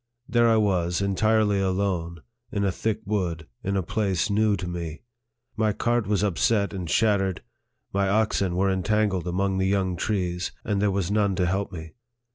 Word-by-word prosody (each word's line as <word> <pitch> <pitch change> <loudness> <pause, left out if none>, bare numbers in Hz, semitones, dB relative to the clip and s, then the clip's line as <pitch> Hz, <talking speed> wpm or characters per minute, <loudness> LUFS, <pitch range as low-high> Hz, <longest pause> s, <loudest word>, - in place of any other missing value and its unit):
There 120 -1 +3
I 110 - +4
was, 90 -5 +1
entirely 105 +1 +2
alone, 95 -4 -1 0.3
in 100 - -1
a 100 - +2
thick 110 +3 -2
wood, 90 -6 -2 0.2
in 100 +1 -1
a 95 - 0
place 100 +1 0
new 105 0 +3
to 90 - -5
me. 85 -2 -5 0.5
My 110 -1 +1
cart 120 0 0
was 105 -1 +1
upset 100 +2 +1
and 90 -4 -5
shat 105 0 +3
tered, 95 -2 -2 0.5
my 100 0 +1
oxen 100 -3 +1
were 95 +1 +2
entangled 95 -1 0
among 95 +2 0
the 95 - +1
young 95 -2 +1
trees, 90 -1 -2
and 105 -3 -1
there 105 - +3
was 95 -1 -1
none 100 -2 +2
to 90 - +1
help 95 +3 -1
me. 80 -2 -8
100 Hz, 180 wpm, -25 LUFS, 90-105 Hz, 0.5 s, I